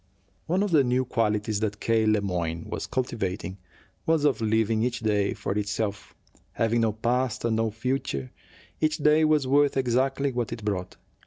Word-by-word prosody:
One 185 +4 +2
of 205 - -1
the 150 -4 +5
new 125 +1 +1
qualities 105 -3 0
that 105 -1 -2
K. 110 -1 +2
Le 105 -1 +3
Moyne 85 -4 -2
was - - -4
cultivating 95 -6 -3 0.5
was 160 -2 +3
of 140 -5 +2
living 110 0 +1
each 120 0 -1
day 105 -3 +1
for - - -4
itself. 105 0 -3 0.4
Having 115 +1 +1
no 110 -2 +2
past 120 +3 -1
and 115 -1 +1
no 115 0 +1
future, 110 - -3 0.5
each 155 -1 +1
day 150 +1 +4
was 155 -3 +3
worth 140 +1 +3
exactly 135 +2 +1
what 120 -2 -2
it 115 -2 -6
brought. 95 -3 -2
115 Hz, 170 wpm, -26 LUFS, 105-130 Hz, 0.5 s, the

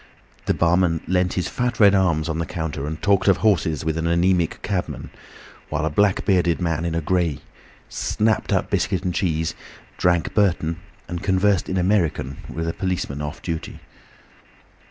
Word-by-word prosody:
The - - +2
barman 85 -1 +2
leant 90 -1 +1
his 90 - -1
fat 125 -2 -2
red 100 -2 +7
arms 85 -5 +2
on 80 0 -2
the 85 - -2
counter 80 -4 -4
and 80 0 -5
talked 100 -1 +2
of 95 - +5
horses 85 -9 +1
with 80 0 -1
an 80 - -1
anaemic 85 0 +2
cabman, 95 -3 -3 0.6
while 80 0 -1
a 80 - -1
black 100 +4 +2
bearded 90 -4 +2
man 85 -2 -1
in 85 -1 -1
grey 85 -3 0 0.5
snapped 110 0 0
up - - 0
biscuit 90 -2 0
and 90 -2 -1
cheese, 80 -3 0 0.5
drank 85 -1 +2
Burton, 85 -5 +1 0.3
and 85 0 -5
conversed 95 0 +2
in 95 - -1
American 90 -8 0
with 80 +1 -4
a 80 - -1
policeman 90 -7 -3
off 75 -1 -6
duty. 80 -1 -5
85 Hz, 165 wpm, -22 LUFS, 80-95 Hz, 0.6 s, red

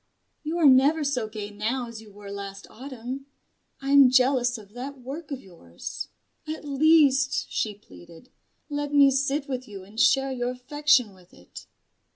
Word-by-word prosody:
"You 315 +3 -3
are 335 - +2
never 280 +4 +5
so 260 -6 -1
gay 210 -1 -7
now 230 +5 -2
as 230 -1 -9
you 215 -2 -15
were 200 0 -11
last 200 -1 -7
Autumn. 260 +2 -7 0.6
I 275 - -2
am 280 -2 +8
jealous 250 -1 +3
of 205 -1 -15
that 265 +3 -7
work 280 +6 -8
of 275 -3 -4
yours. 90 - -8 0.4
At 310 0 -6
least," 285 -1 +3
she 215 -2 -1
pleaded, 165 - -16 0.4
"let 290 -1 -3
me 280 -1 +7
sit 275 +2 0
with 255 -2 -4
you 200 -3 -9
and 205 +4 -10
share 270 +2 +4
your 245 -1 -2
affection 255 -2 +1
with 185 -2 -20
it." 90 - -13
255 Hz, 170 wpm, -26 LUFS, 215-280 Hz, 0.6 s, am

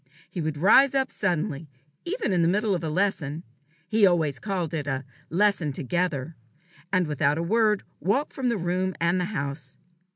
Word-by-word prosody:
He 175 - -4
would 155 -1 -2
rise 260 - +5
up 265 -1 +1
suddenly, 155 -5 -2 0.4
even 405 - -1
in 175 - +2
the 165 - +3
middle 205 +3 +1
of 175 -3 -2
a 160 - -1
lesson 165 -3 -1 0.4
he 215 +4 +2
always 165 -7 +3
called 185 -6 -3
it 150 -3 -3
"a 135 -1 -2 0.2
lesson 185 -4 +2
together" 160 +1 -2 0.6
and 185 -2 +2
without 145 -1 +1
a 165 - -1
word 215 +2 +2 0.2
walk 255 - 0
from 260 -2 -1
the 235 - 0
room 185 +1 -1
and 170 +2 +2
the - - 0
house. 140 -7 -5
175 Hz, 175 wpm, -26 LUFS, 155-205 Hz, 0.6 s, rise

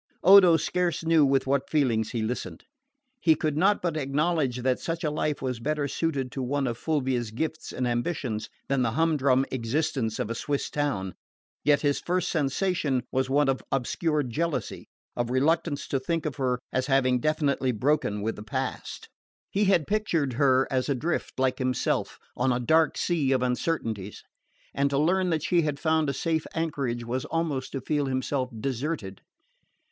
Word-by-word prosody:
Odo 185 -2 +8
scarce 175 0 -1
knew 165 -2 +5
with 135 -1 +2
what 135 0 0
feelings 120 -8 +1
he 115 -3 -2
listened. 120 +3 -4 0.5
He 160 -8 +4
could 155 -2 -1
not 195 +6 +2
but 170 -3 0
acknowledge 145 -3 0
that 130 -1 +1
such 165 +1 -4
a 150 - 0
life 150 -1 -2
was 125 -3 -2
better 150 +3 -1
suited 140 -3 -2
to 135 - -4
one 135 +2 -1
of 120 -2 -1
Fulvia's 130 -7 -1
gifts 155 +8 -4
and 125 - -2
ambitions 120 -3 -2 0.2
than 135 -1 +1
the 115 -2 0
humdrum 140 -4 +2
existence 130 -1 -1
of 110 - -2
a - - 0
Swiss 140 +4 -2
town; 135 -11 -1 0.5
yet 145 -1 +4
his 145 -1 +1
first 180 0 -1
sensation 145 -3 0
was 130 0 0
one 145 +1 +3
of 135 -1 0
obscure 150 +4 0
jealousy, 155 +6 -3 0.3
of 120 -1 -1
reluctance 150 +3 +1
to 135 - 0
think 165 +5 -2
of 145 -3 -3
her 130 -2 0 0.2
as 130 0 0
having 130 -2 +3
definitely 145 -2 +1
broken 125 -3 0
with 110 +1 -2
the - - -7
past. 105 - -4 0.4
He 205 +1 +2
had 190 -6 +3
pictured 170 - 0
her 130 0 +3
as 130 +1 0
adrift, 145 +5 -1
like 130 0 +1
himself, 130 -1 -1 0.2
on 130 - +1
a 125 - +1
dark 160 +6 +3
sea 155 -6 +1
of 130 -1 +1
uncertainties; 115 - -2 0.5
and 140 0 +1
to 140 - 0
learn 180 +5 +2
that 160 -3 0
she 175 -2 +3
had 150 -2 -2
found 160 -2 +1
a - - -1
safe 160 0 -1
anchorage 140 -7 -2
was 125 +2 -2
almost 155 -5 -2
to 135 - -3
feel 145 +2 0
himself 130 0 -1
deserted. 130 -5 -3
140 Hz, 175 wpm, -27 LUFS, 125-160 Hz, 0.5 s, Odo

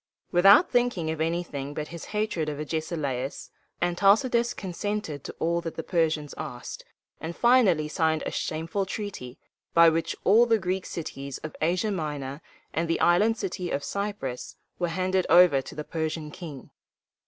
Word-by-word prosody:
Without 195 - +6
thinking 245 -10 +1
of 160 0 -4
anything 160 -4 -2
but 150 0 -4
his 170 -1 -8
hatred 210 -7 -1
of 145 -1 -5
Agesilaus, 150 -4 -3 0.3
Antalcidas 225 +7 +3
consented 190 -5 -4
to - - -7
all 170 +1 0
that 165 -1 -6
the 165 - -4
Persians 160 -4 0
asked, 135 -6 -6 0.4
and 165 +1 -5
finally 220 -11 +4
signed 160 0 0
a - - -2
shameful 165 +5 -2
treaty, 190 - -6 0.4
by 170 0 +8
which 165 +1 -1
all 230 +5 +6
the 225 -1 +4
Greek 185 -1 -2
cities 140 -5 -6
of 155 - -6
Asia 180 +7 +1
Minor 150 -5 -4 0.3
and 165 +1 0
the 165 - 0
Island 210 +6 +4
of 190 - -1
Cy´prus 180 -4 -4 0.2
were 175 - 0
handed 185 +2 0
over 170 -5 +7
to - - -10
the 150 - -4
Persian 160 -1 -3
king. 165 -7 -9
170 Hz, 155 wpm, -27 LUFS, 155-195 Hz, 0.4 s, by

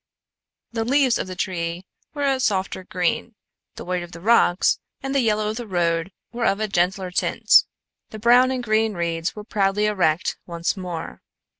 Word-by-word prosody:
The 225 -1 -2
leaves 260 +1 +2
of - - -3
the 185 - -6
trees 175 -1 -3 0.3
were 290 - -2
a 270 -1 +1
softer 190 -6 -1
green, 185 +4 -2 0.4
the - - -8
white 180 0 -2
of 175 0 -9
the 165 - -9
rocks 195 -2 +3 0.2
and 270 0 -3
the 275 - +3
yellow 215 -3 +1
of 215 - -4
the 240 -2 -6
road 170 -1 0 0.2
were 235 -1 0
of 195 - +1
a 215 - 0
gentler 185 0 0
tint; - - +4 0.5
the 220 - -8
brown 245 +4 +5
and 255 -1 -2
green 220 -1 +1
reeds 170 0 -2
were 210 - -7
proudly 205 -1 +1
erect 175 -6 +1
once 170 +1 -2
more. 180 -4 -6
195 Hz, 180 wpm, -23 LUFS, 175-230 Hz, 0.5 s, brown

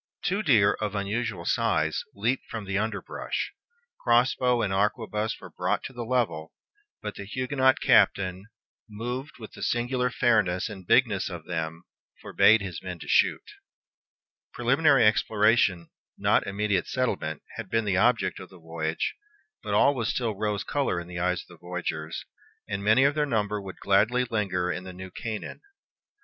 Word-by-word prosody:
Two 200 +3 0
deer, 110 - +4
of 105 -1 -2
unusual 100 -2 -2
size, - - +1
leaped 120 +6 -1
from 110 -3 -5
the 95 0 -3
underbrush. 105 0 -3 0.5
Cross 120 +1 +3
bow 125 -2 +1
and 100 -2 -1
arquebuse 105 +2 -1
were - - -11
brought - - -1
to 130 - -7
the 120 -1 -5
level; 110 -11 -1 0.5
but - - -4
the - - -8
Huguenot 130 +4 +1
captain, 95 +1 +3 0.4
"moved 125 +7 -5
with 110 -3 -10
the - - -12
singular 125 +1 0
fairness 110 -7 +2
and 95 -4 -10
bigness 110 -8 +3
of 85 -4 -8
them," 80 -1 -4 0.4
forbade 110 0 +4
his 90 -4 -6
men 90 -2 -6
to - - -11
shoot. - - +3 1.1
Preliminary 135 +1 +4
exploration, 105 -4 +3 0.3
not - - +2
immediate 100 -1 0
settlement, 95 - -2
had 115 -4 -6
been 115 +1 +1
the 95 -2 +1
object 110 -3 +2
of 95 - -10
the 95 - -15
voyage; 80 -1 -3 0.5
but - - -2
all 140 - +5
was 115 -5 -2
still 115 -3 -1
rose 105 0 -2
color 140 -11 -1
in 85 - -8
the 90 0 -6
eyes 90 0 0
of - - -25
the 85 - -15
voyagers, 85 -2 -5 0.4
and 100 0 -3
many 110 +6 +5
of 140 +1 +4
their 150 -1 0
number 105 -4 -1
would 95 -1 -9
gladly 110 +6 +2
linger 95 -6 -1
in 90 - -4
the 95 0 -8
New 95 +1 -9
Canaan. 110 +2 -6
105 Hz, 165 wpm, -27 LUFS, 95-120 Hz, 1.1 s, all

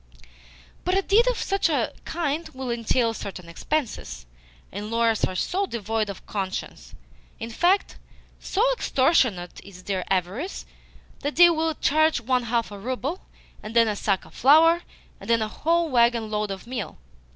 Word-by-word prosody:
"But 365 +2 +1
a 390 - +1
deed 445 +6 +4
of - - +1
such 390 -3 0
a 275 -8 0
kind 325 -1 -2
will 260 -2 -4
entail 230 0 +1
certain 190 -5 -7
expenses, 215 - -3 0.5
and 205 +2 -6
lawyers 230 -1 +2
are 185 - -5
so 385 - -1
devoid 220 - -2
of 195 - -8
conscience! 195 -2 -5 0.4
In 230 0 -6
fact, 360 - +1 0.4
so 410 - 0
extortionate 255 - +1
is 185 -2 -13
their 190 -2 -2
avarice 195 - -2 0.5
that 290 +1 -3
they 345 +1 +8
will 320 -1 0
charge 310 +1 +2
one 250 +1 0
half 230 -1 -1
a 205 - -8
rouble, 260 - -3 0.4
and 215 +2 -8
then 230 -1 +5
a 210 - -1
sack 195 -2 -1
of - - -17
flour, 325 +6 +5 0.4
and - - -11
then 230 -1 +3
a - - -2
whole 335 +8 0
waggon 235 -3 +2
load 210 -1 -1
of 195 -1 -6
meal. 235 -8 -5
235 Hz, 160 wpm, -25 LUFS, 210-320 Hz, 0.5 s, they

